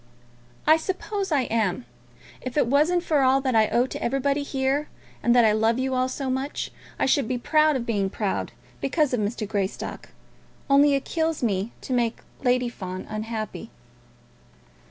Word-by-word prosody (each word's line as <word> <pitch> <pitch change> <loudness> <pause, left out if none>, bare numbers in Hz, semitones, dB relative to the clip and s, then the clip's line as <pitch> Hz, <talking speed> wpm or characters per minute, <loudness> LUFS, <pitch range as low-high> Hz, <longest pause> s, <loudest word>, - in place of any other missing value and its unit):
"I 315 +1 +6
suppose 380 +3 -3
I 290 -3 +3
am. 225 -2 -1 0.6
If 255 +2 -5
it 290 - +4
wasn't 305 +8 +2
for 305 -5 +2
all 265 +1 +4
that 260 -2 0
I 220 -1 +4
owe 240 +3 +2
to - - -6
everybody 275 +3 +1
here, 275 +1 -1 0.3
and 240 - +3
that 240 -2 +6
I 215 - +5
love 220 +2 +2
you 260 0 -1
all 255 0 +1
so 270 +1 -4
much, 265 +2 -2 0.3
I - - +1
should 270 -2 +2
be 255 - -1
proud 305 +3 +3
of 245 -3 -2
being 200 -4 0
proud; 205 0 -2 0.3
because 285 0 +1
of 245 - +1
Mr. 215 +1 -2
Greystock. 200 -2 -3 0.6
Only 280 +1 +6
it 275 - -2
kills 320 -3 -1
me 205 0 0
to 260 - -4
make 235 -2 0 0.2
Lady 250 -1 +2
Fawn 185 -5 -6
unhappy." 215 +1 -5
255 Hz, 175 wpm, -25 LUFS, 225-285 Hz, 0.6 s, I